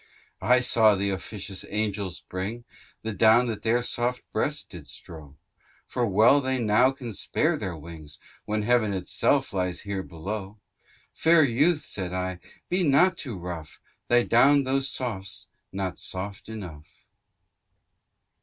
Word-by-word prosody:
Thyrsis. - - -4
I 125 - +7
saw 110 -4 +4
th'officious 100 0 -3
angels 100 -3 -2
bring, 100 +6 -5 0.4
The 110 - -2
down 115 +3 +5
that 115 -3 -4
their 120 +2 +2
soft 125 0 -1
breasts - - 0
did - - -11
strow, 75 -4 -8 0.5
For 120 -2 -1
well 110 +8 +5
they 130 0 -1
now 120 +2 +4
can 130 -4 -6
spare - - 0
their 90 -3 -4
wings, 75 -1 -10 0.3
When 105 0 -1
Heaven 115 -3 +2
itself 130 +9 +1
lies 90 -2 -1
here 100 -2 -3
below. 95 +4 -6 0.6
Fair 165 0 +5
youth 145 +6 +3
(said 90 -3 -5
I) 90 -1 -3 0.3
be 185 +1 +1
not 170 +4 +4
too 125 - -6
rough, 85 -3 -7 0.3
Thy 120 0 +4
down 140 +5 +5
though 135 +1 +1
soft's 120 -7 -4 0.3
not 95 -1 -3
soft 95 +3 -5
enough. 90 -9 -8
110 Hz, 140 wpm, -26 LUFS, 95-125 Hz, 0.6 s, I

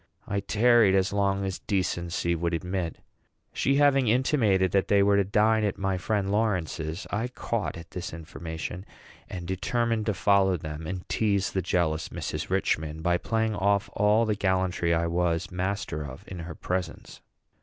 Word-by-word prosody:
I 100 - -1
tarried 110 0 +4
as 95 +1 +1
long 100 -1 +1
as 95 -1 -3
decency 85 -3 -1
would 85 0 -1
admit. 90 0 -3 0.6
She 135 - +1
having 140 -3 +4
intimated 110 - +2
that 100 -1 +2
they 100 -1 +4
were 100 0 +4
to 100 - +4
dine 110 +3 +2
at 100 -2 -1
my 95 -1 -1
friend 100 0 -1
Lawrence's, 90 -5 -1
I 110 +4 -1
caught 115 -6 -3
at 85 0 -11
this 90 0 -5
information, 80 +2 -6 0.5
and 90 -2 -6
determined 115 +4 -1
to 105 - +1
follow 95 -1 +3
them, 75 0 -6
and 90 +1 -5
tease 100 -3 +1
the 95 - 0
jealous 80 -3 0
Mrs. - - -4
Richman 80 +1 -1
by 85 0 +2
playing 110 +2 0
off 100 0 +1
all 105 +3 +3
the 110 - +1
gallantry 95 -3 0
I 85 0 +2
was 85 +1 0
master 90 -4 -2
of 65 -2 -9
in 90 - -8
her 85 -1 -7
presence. 90 -2 -4
95 Hz, 165 wpm, -27 LUFS, 85-105 Hz, 0.6 s, tarried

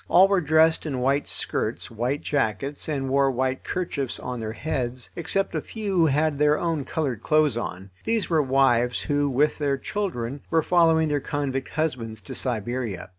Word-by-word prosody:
All 185 +3 +7
were 195 -2 +2
dressed 160 +1 +3
in 135 -4 -2
white 140 +3 +1
skirts, - - -1
white 125 +6 -2
jackets, 140 +2 -1
and 135 -3 -1
wore 135 +1 +3
white 130 0 -1
kerchiefs 145 -8 -2
on 125 -1 -5
their 110 -1 -4
heads, 125 -1 -3
except 195 +4 -1
a - - -1
few 210 -3 -4
who 170 -2 +5
had 150 0 +1
their 150 0 +4
own 165 -5 -1
coloured 135 -9 -2
clothes 155 -1 +3
on. 95 -4 -5
These 225 -3 0
were 160 -3 +3
wives 130 -3 +2
who, 145 -1 0
with 145 +4 +1
their 140 -2 +1
children, 140 - -3
were 165 -1 +2
following 165 -2 +4
their 145 -1 0
convict 135 -2 -3
husbands 125 -9 -2
to 90 - -9
Siberia. 120 -3 -3
140 Hz, 180 wpm, -25 LUFS, 125-160 Hz, -, All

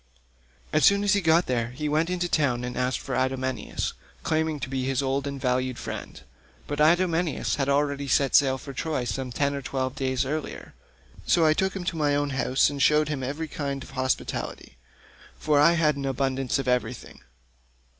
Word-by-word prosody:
As 155 - +3
soon 200 0 +5
as 205 -1 +3
he 200 - +2
got 165 0 +4
there 120 -3 0
he 130 +5 -5
went 155 +3 +1
into 180 -1 -1
the - - +1
town 130 -5 +1
and 125 0 -4
asked 125 +1 0
for 135 - -6
Idomeneus, 130 -1 -2 0.3
claiming 160 -1 0
to - - -3
be 130 0 -2
his 135 +1 0
old 135 +1 -1
and 140 -1 -5
valued 130 -1 0
friend, - - -7 0.5
but 145 - -4
Idomeneus 170 0 +2
had 140 -1 0
already 140 0 +1
set 135 +1 +2
sail 135 -2 +5
for 140 +1 -9
Troy 150 -1 -2
some 125 +2 -3
ten 140 +3 0
or 140 - -4
twelve 130 -1 -2
days 130 -1 -1
earlier, 150 +3 -5 0.5
so 170 -2 +4
I 155 - +5
took 190 +4 -1
him 190 - -4
to 175 -1 -2
my 145 -2 +2
own 145 0 0
house 130 0 +2
and 145 -1 -3
showed 150 +2 +4
him 145 -3 -2
every 145 +5 -3
kind 140 -2 -4
of - - -13
hospitality, 130 - -3 0.6
for 150 -2 +2
I 160 +4 +6
had 155 -4 +2
abundance 135 -1 -1
of 135 -2 -3
everything. 125 0 -2
140 Hz, 195 wpm, -26 LUFS, 130-155 Hz, 0.6 s, I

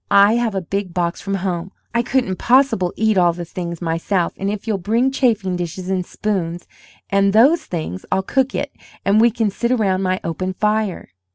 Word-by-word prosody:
I 200 +2 +6
have 235 -3 0
a 190 - 0
big 190 0 -3
box 170 -1 -1
from 195 0 -2
home. 180 0 -2 0.2
I 235 - +2
couldn't 240 -6 0
possible 250 -8 +3
eat 220 -3 +2
all 175 -1 +4
the 175 0 -6
things 170 0 -6
myself, 170 +2 0
and 195 - -2
if 205 0 -4
you'll 215 -4 -1
bring 230 +8 +1
chafing 220 -9 +1
dishes 180 +2 -4
and 185 -1 0
spoons, 175 -3 -3 0.5
and 200 0 +3
those 275 +10 +5
things, 155 - -5
I'll 190 - +1
cook 265 +5 0
it, 285 0 -3 0.3
and 205 +2 +4
we 235 - +6
can 225 -2 -1
sit 235 +5 -1
round 195 -4 +1
my 185 0 0
open 185 +3 -3
fire." 210 - -1
195 Hz, 195 wpm, -20 LUFS, 180-220 Hz, 0.5 s, I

